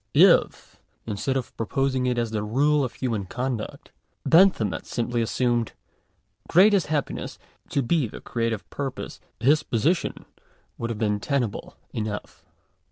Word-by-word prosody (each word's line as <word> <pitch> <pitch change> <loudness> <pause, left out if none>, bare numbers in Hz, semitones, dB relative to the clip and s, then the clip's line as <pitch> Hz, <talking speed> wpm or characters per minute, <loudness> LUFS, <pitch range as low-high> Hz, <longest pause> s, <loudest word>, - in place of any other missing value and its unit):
§ - - +9
1. - - -7
If, - - -22 0.3
instead 115 +5 -1
of 125 - -5
proposing 130 +3 0
it 125 -1 0
as 115 -2 0
the 110 -1 -1
rale 140 +7 +2
of 125 - -3
human 110 -7 -2
conduct* 125 0 -4 0.3
Bentham 165 - +5
had - - -6
simply 120 0 -1
assumed 120 0 0 0.4
" - - -33
greatest 195 +1 +5
happiness" 150 -2 -2 0.3
to 140 -3 0
he 155 -4 +2
the - - -9
creative 115 -3 -2
purpose, 140 -2 -5 0.2
his 145 +7 +4
position 150 - 0 0.5
would 115 - -2
have 115 - -3
heen 105 -2 0
tenable 130 -6 -2 0.2
enough. 105 -1 -5
120 Hz, 150 wpm, -25 LUFS, 110-140 Hz, 0.5 s, §